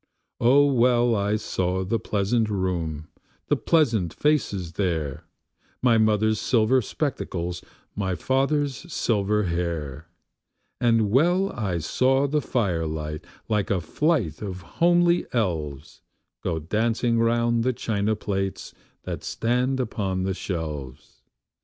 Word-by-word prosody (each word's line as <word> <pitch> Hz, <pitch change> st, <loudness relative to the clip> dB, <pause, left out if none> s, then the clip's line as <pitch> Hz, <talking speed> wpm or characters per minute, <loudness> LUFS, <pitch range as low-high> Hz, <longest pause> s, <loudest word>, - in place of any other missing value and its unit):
O 135 Hz, +5 st, +5 dB
well 120 Hz, -3 st, +3 dB
I 100 Hz, +1 st, +1 dB
saw 95 Hz, -3 st, -1 dB
the 115 Hz, +4 st, 0 dB
pleasant 105 Hz, +3 st, 0 dB
room, 85 Hz, -6 st, -2 dB, 0.4 s
the -, -, +4 dB
pleasant 115 Hz, -, +1 dB
faces 105 Hz, -, 0 dB
there, 80 Hz, -7 st, -2 dB, 0.6 s
My 120 Hz, -3 st, +5 dB
mother's 110 Hz, 0 st, +2 dB
silver 125 Hz, +1 st, +3 dB
spectacles, 90 Hz, -, -3 dB, 0.3 s
my 95 Hz, -3 st, -1 dB
father's 140 Hz, -, 0 dB
silver 105 Hz, -4 st, +1 dB
hair; 85 Hz, -6 st, -3 dB, 0.7 s
And 115 Hz, -4 st, +2 dB
well 175 Hz, -, +3 dB
I 100 Hz, -7 st, -2 dB
saw 130 Hz, -, +2 dB
the 150 Hz, +1 st, 0 dB
firelight, 80 Hz, -, -2 dB, 0.2 s
like 105 Hz, -3 st, 0 dB
a 100 Hz, -, +1 dB
flight 110 Hz, -, 0 dB
of 95 Hz, -3 st, -5 dB, 0.2 s
homely 175 Hz, 0 st, +4 dB
elves, 80 Hz, -, -2 dB, 0.4 s
Go 85 Hz, -, -1 dB
dancing 115 Hz, +7 st, 0 dB
round 115 Hz, 0 st, +2 dB
the 130 Hz, -, +2 dB
china 110 Hz, -3 st, -1 dB
plates 95 Hz, -2 st, -3 dB, 0.3 s
that -, -, -5 dB
stand 125 Hz, +3 st, 0 dB
upon 100 Hz, -6 st, -2 dB
the 95 Hz, 0 st, -1 dB
shelves. 75 Hz, -9 st, -6 dB
105 Hz, 115 wpm, -25 LUFS, 90-125 Hz, 0.7 s, O